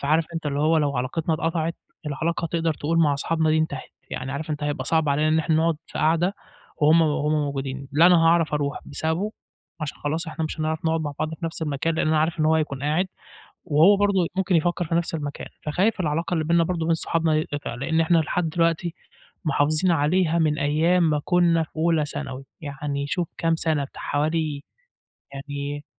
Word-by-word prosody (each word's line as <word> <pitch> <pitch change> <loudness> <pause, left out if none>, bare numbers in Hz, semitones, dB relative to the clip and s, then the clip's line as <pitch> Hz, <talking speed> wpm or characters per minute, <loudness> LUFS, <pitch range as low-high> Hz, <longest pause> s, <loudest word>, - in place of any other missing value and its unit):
فعارف 155 +3 +2
أنت 165 -2 -3
اللي 140 0 -1
هو 160 +2 +3
لو 145 -3 +1
علاقتنا 155 +6 -1
اتقطعت، 165 +1 -1 0.3
العلاقة 165 +4 -1
تقدَر 165 -2 -1
تقول 165 +3 -1
مع 150 -3 +4
أصحابنا 160 +2 0
دي 155 - +3
انتهت، 145 -4 -3 0.2
يعني 135 - -4
عارف 150 +3 -4
أنت 150 -1 -3
هيبقى 145 0 -2
صعب 160 -2 +1
علينا 150 +2 +2
إن 160 +1 +3
إحنا 160 0 +1
نقعد 165 -1 +2
في - - -7
قعدة 170 +5 +2 0.4
وهُم 155 +2 +5
وهُم 150 -1 +1
موجودين، 140 -2 -2
لا 165 +4 +6
أنا 180 -1 +7
هاعرف 165 -2 +3
أرُوح 140 -1 -1
بسببه؛ 160 +8 -2 0.5
عشان 150 -1 -5
خلاص 160 +3 -2
إحنا 160 0 -3
مش 155 0 -5
هنعرف 155 +1 -2
نقعد 160 0 +1
مع 150 -2 -3
بعض 155 +1 -2
في 165 - -8
نفْس 165 0 -5
المكان، 155 +2 -1
لأن 155 - 0
أنا 155 - +3
عارف 160 +2 0
إن - - +3
هو 160 +1 +4
هيكون 145 -4 -1
قاعد 155 +6 +1 0.6
وهو 165 +7 +5
برضو 200 -3 +2
ممكن 190 -2 +1
يفكر 175 +2 +1
في 165 +1 -1
نفْس 170 -1 0
المكان، 145 -2 -5 0.2
فخايف 185 +8 +1
العلاقة 165 +3 -1
اللي 160 - +1
بيننا 170 +1 +3
برضو 165 -1 -2
وبين 165 0 +2
صحابنا 160 -1 +1
تتقطع، 145 -5 -5
لأن 160 +6 0
إحنا 165 +1 +3
لحد 165 +1 0
دلوقتي 165 +1 0 0.5
محافظين 155 +4 +2
عليها 165 +2 +2
من 155 -1 +1
أيام 165 +5 +2
ما 150 -1 +1
كنا 170 -2 +3
في - - -11
أولى 160 -1 +2
ثانوي، 135 -2 -6 0.2
يعني 140 -1 -4
شوف 175 +2 -1
كام 165 0 +1
سنة! 160 -3 0
بتاع 135 - -10
حوالي 150 0 -1 0.7
يعني 145 +1 -5
160 Hz, 200 wpm, -24 LUFS, 145-165 Hz, 0.7 s, أنا